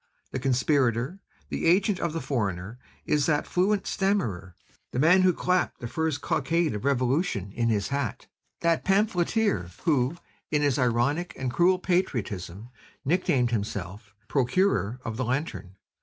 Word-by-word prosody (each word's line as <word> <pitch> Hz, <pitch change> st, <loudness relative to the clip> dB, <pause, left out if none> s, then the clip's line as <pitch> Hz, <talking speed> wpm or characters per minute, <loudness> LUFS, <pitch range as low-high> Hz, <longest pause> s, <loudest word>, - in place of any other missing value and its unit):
The -, -, -3 dB
conspirator, 130 Hz, -, +1 dB, 0.3 s
the -, -, -1 dB
agent 190 Hz, +3 st, +3 dB
of 170 Hz, -, -1 dB
the 165 Hz, +1 st, -3 dB
foreigner 105 Hz, -3 st, -3 dB, 0.3 s
is 150 Hz, -1 st, +1 dB
that 150 Hz, -2 st, +1 dB
fluent 195 Hz, +3 st, +1 dB
stammerer, 115 Hz, -, -1 dB, 0.3 s
the -, -, -6 dB
man 165 Hz, +7 st, +5 dB
who 185 Hz, 0 st, +5 dB
clapped 180 Hz, +1 st, 0 dB
the 120 Hz, -, -5 dB
first 160 Hz, +1 st, -1 dB
cockade 165 Hz, +1 st, 0 dB
of 105 Hz, +4 st, -5 dB
revolution 130 Hz, -, 0 dB
in 115 Hz, +2 st, 0 dB
his 105 Hz, -3 st, 0 dB
hat, 135 Hz, -3 st, -3 dB, 0.4 s
that 170 Hz, -1 st, +2 dB
pamphleteer 195 Hz, -, +1 dB
who, 145 Hz, -1 st, +1 dB, 0.3 s
in 150 Hz, -1 st, +1 dB
his 140 Hz, -2 st, +2 dB
ironical 125 Hz, +8 st, 0 dB
and 130 Hz, -2 st, -2 dB
cruel 180 Hz, +5 st, +4 dB
patriotism, 115 Hz, -, -2 dB, 0.4 s
nicknamed 135 Hz, -6 st, +2 dB
himself, 105 Hz, -1 st, -4 dB
'The -, -, -36 dB
procureur 130 Hz, -, +1 dB
of 110 Hz, -1 st, -4 dB
the 130 Hz, -, -1 dB
Lantern.' 125 Hz, -, -3 dB
135 Hz, 145 wpm, -27 LUFS, 115-175 Hz, 0.4 s, man